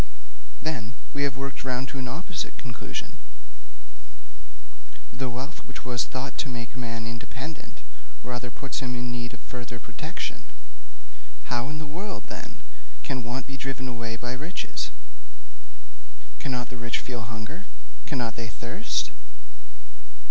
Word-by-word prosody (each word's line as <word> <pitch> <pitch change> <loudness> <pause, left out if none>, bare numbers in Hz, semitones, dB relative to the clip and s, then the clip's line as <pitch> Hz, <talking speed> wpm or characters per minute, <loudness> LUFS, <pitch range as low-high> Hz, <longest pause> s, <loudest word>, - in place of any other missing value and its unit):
'Then, 130 -6 +2 0.2
we 140 - +3
have 140 -2 +5
worked 140 0 0
round 130 0 +3
to 135 - -1
an 130 - +1
opposite 170 +5 0
conclusion: 120 -4 -2 2.0
the 130 0 +2
wealth 130 +7 -1
which 130 - -5
was 120 -3 +5
thought 130 +2 0
to 135 - +4
make 120 -1 -1
a 130 - -3
man 115 -2 +1
independent 130 +6 -3 0.4
rather 125 0 0
puts 135 +2 0
him 125 -1 +2
in 120 0 +2
need 120 0 +1
of 120 - -6
further 120 -1 -3
protection. - - -1 1.1
How 120 +3 +4
in 150 - 0
the 155 - -1
world, 185 +7 -1
then, - - -5 0.4
can 130 -2 +2
want 120 +3 +1
be 135 -1 -3
driven 135 0 +1
away 115 -2 +1
by 120 +1 +1
riches? 155 +8 +1 1.5
Cannot 125 -3 +2
the 125 - -3
rich 120 0 +4
feel 120 -2 0
hunger? 125 - -3 0.4
Cannot 120 -7 +3
they 115 -1 0
thirst? - - +2
125 Hz, 140 wpm, -32 LUFS, 120-135 Hz, 2.0 s, have